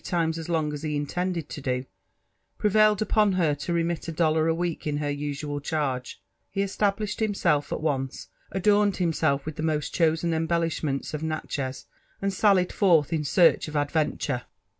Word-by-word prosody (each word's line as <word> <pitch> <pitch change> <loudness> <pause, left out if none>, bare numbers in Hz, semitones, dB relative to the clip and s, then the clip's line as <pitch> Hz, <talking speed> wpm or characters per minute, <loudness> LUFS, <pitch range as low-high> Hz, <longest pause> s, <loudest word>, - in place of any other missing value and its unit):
times 165 -2 0
as 165 - -7
long 155 -3 0
as 145 - -5
he 155 -1 -2
intended 170 +2 -2
to 145 - -7
do, 125 -1 -1 0.7
prevailed 215 0 +4
upon 210 -2 +3
her 170 -5 +2
to 145 +5 -4
remit 170 -1 -1
a - - -2
dollar 160 -1 +2
a 165 - +2
week 170 -2 -3
in 145 -1 0
her 145 -1 -1
usual 145 0 -4
eharge, 135 -4 -2 0.3
he 195 - -1
established 200 +1 -1
himself 175 -9 +1
at - - -2
once, 135 -4 -2 0.2
adorned 205 +1 +3
himself 160 -5 +1
with 155 -1 -6
the - - -3
moat 155 -2 0
chosen 165 0 +2
embellishments 160 -4 -1
of 150 - -3
Natchez, 150 -4 -3 0.3
and 195 0 -1
sallied 190 -2 +3
forth 165 -6 +3
in 155 -2 0
search 165 +3 +4
of 155 - -7
adventure. 145 -3 0
160 Hz, 170 wpm, -26 LUFS, 145-180 Hz, 0.7 s, prevailed